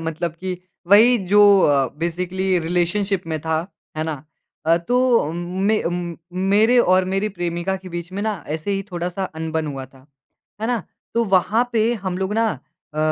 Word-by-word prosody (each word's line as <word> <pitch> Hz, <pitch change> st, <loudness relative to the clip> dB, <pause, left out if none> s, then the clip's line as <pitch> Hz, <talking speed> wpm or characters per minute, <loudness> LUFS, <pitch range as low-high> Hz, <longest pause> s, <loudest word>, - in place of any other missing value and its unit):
मतलब 165 Hz, +1 st, -3 dB
कि 185 Hz, -1 st, -3 dB, 0.3 s
वहीं 215 Hz, +1 st, +6 dB
जो 205 Hz, +3 st, +4 dB, 0.2 s
अ, 140 Hz, -4 st, +3 dB
बेसिकली 180 Hz, +2 st, -1 dB
रिलेशनशिप 180 Hz, +3 st, 0 dB
में 160 Hz, -1 st, -2 dB
था, 160 Hz, +2 st, -1 dB, 0.3 s
है 155 Hz, -, -1 dB
ना? 155 Hz, -2 st, -5 dB, 0.4 s
अ, 165 Hz, +1 st, +5 dB
तो 250 Hz, +1 st, +3 dB, 0.2 s
उम, 160 Hz, +3 st, -3 dB, 0.3 s
में 215 Hz, +1 st, +2 dB
उम, 175 Hz, -1 st, -3 dB, 0.2 s
मेरे 205 Hz, +6 st, +3 dB
और 185 Hz, -5 st, +4 dB
मेरी 200 Hz, +2 st, 0 dB
प्रेमिका 175 Hz, 0 st, -2 dB
के 190 Hz, 0 st, -11 dB
बीच 170 Hz, 0 st, -6 dB
में 200 Hz, +2 st, -3 dB
ना 210 Hz, -7 st, -2 dB
ऐसे 160 Hz, +6 st, -5 dB
ही 195 Hz, 0 st, -1 dB
थोड़ा-सा 175 Hz, +2 st, -3 dB
अनबन 160 Hz, -1 st, -3 dB
हुआ 135 Hz, -2 st, -5 dB
था। 135 Hz, +1 st, -21 dB, 0.5 s
है 220 Hz, -, -1 dB
ना? 235 Hz, -5 st, 0 dB, 0.3 s
तो 235 Hz, 0 st, +2 dB
वहाँ 200 Hz, +5 st, +2 dB
पे 225 Hz, +1 st, +2 dB
हम 190 Hz, -3 st, -4 dB
लोग 190 Hz, +2 st, -2 dB
ना 225 Hz, 0 st, +2 dB, 0.5 s
अ, -, -, -5 dB
180 Hz, 180 wpm, -21 LUFS, 165-200 Hz, 0.5 s, वहीं